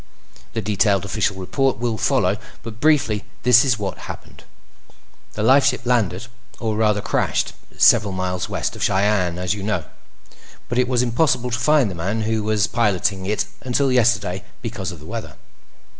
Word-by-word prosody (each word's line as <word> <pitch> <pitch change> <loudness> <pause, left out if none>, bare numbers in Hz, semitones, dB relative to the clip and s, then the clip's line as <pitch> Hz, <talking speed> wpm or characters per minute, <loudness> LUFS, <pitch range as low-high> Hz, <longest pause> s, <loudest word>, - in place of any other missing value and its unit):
The 115 - -2
detailed 100 -1 +1
official 100 -1 -1
report 130 +8 0
will 120 0 -1
follow, - - +1 0.2
but 110 -1 -8
briefly, 130 -9 +2 0.2
this 120 0 +6
is 130 -4 +1
what 100 -2 -5
happened: - - -10 0.9
The 105 - -3
lifeship 130 0 +4
landed—or, 115 -1 -2
rather, 105 -1 +2
crashed—several 100 0 +1
miles 95 -1 -3
west - - -2
of - - -9
Cheyenne, 95 -3 +1
as 90 +1 -1
you 105 - -6
know, 100 -5 -1 0.9
but 120 +2 0
it 125 - +2
was 125 -1 +2
impossible 125 0 +1
to 115 - -1
find 135 -3 +3
the - - -5
man 95 +6 -2
who 110 0 0
was 105 -2 +1
piloting 100 -4 0
it 105 +1 0 0.2
until 130 +1 +1
yesterday 115 -6 +1 0.2
because 105 -5 -4
of 85 - -9
the 75 - -13
weather. 115 +3 -6
110 Hz, 160 wpm, -21 LUFS, 100-120 Hz, 0.9 s, this